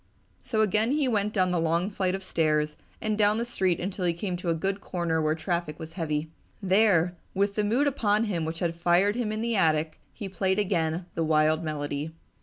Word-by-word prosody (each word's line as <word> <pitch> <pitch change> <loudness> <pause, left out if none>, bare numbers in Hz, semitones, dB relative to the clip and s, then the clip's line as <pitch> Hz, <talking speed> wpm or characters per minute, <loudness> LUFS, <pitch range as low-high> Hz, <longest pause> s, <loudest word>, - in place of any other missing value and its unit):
So 220 -3 0
again 215 +4 +2
he 295 -2 +1
went 210 -3 +1
down 185 -4 +1
the 175 - +1
long 170 +4 +1
flights 190 -1 0
of 195 - -6
stairs 155 -4 +1 0.3
and 215 -1 0
down 210 0 +3
the 235 - -1
street 190 -7 0
until 190 +1 -3
he 170 - +2
came 180 +2 -3
to 175 0 -3
a 165 - +2
good 195 +4 -2
corner 170 -3 -1
where 155 0 +1
traffic 170 -2 -2
was 160 -1 -8
heavy. 155 -3 -2 0.3
There, 190 -3 +3 0.2
with 200 +1 +1
the 210 - 0
mood 235 +8 +2
upon 220 -6 +2
him 185 -7 -1
which 160 +1 -3
had 170 -2 0
fired 175 +4 +2
him 235 -3 -1
in 215 0 -3
the 235 0 0
attic, 155 -4 +1
he 205 - -7
played 190 0 0
again 175 -4 0
the 165 - -1
wild 155 +1 +2
melody. 150 0 -3
180 Hz, 215 wpm, -27 LUFS, 160-210 Hz, 0.3 s, down